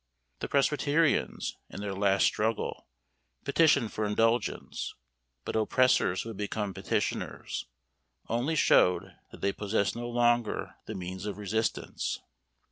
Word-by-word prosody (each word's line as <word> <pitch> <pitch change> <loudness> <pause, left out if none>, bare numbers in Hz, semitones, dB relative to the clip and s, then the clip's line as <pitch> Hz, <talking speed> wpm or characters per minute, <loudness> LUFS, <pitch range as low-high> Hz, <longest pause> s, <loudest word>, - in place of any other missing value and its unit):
The - - -3
presbyterians, 145 +2 +1
in - - -8
their 100 -1 -3
last 95 0 +3
struggle, 110 +1 -1 0.6
petitioned 145 -8 +3
for 110 - -2
indulgence; 115 +3 0 0.5
but - - -3
oppressors 110 -4 +3
who 115 - -7
had 110 - -7
become 105 -1 -2
petitioners, 95 -7 -2 0.6
only 125 +8 0
showed 90 - +4 0.2
that - - -13
they 100 - +1
possessed 100 -1 0
no 120 0 -4
longer 120 -1 +1
the - - -5
means 95 +2 -5
of 100 - -4
resistance. 110 +2 -2
110 Hz, 125 wpm, -29 LUFS, 100-120 Hz, 0.6 s, showed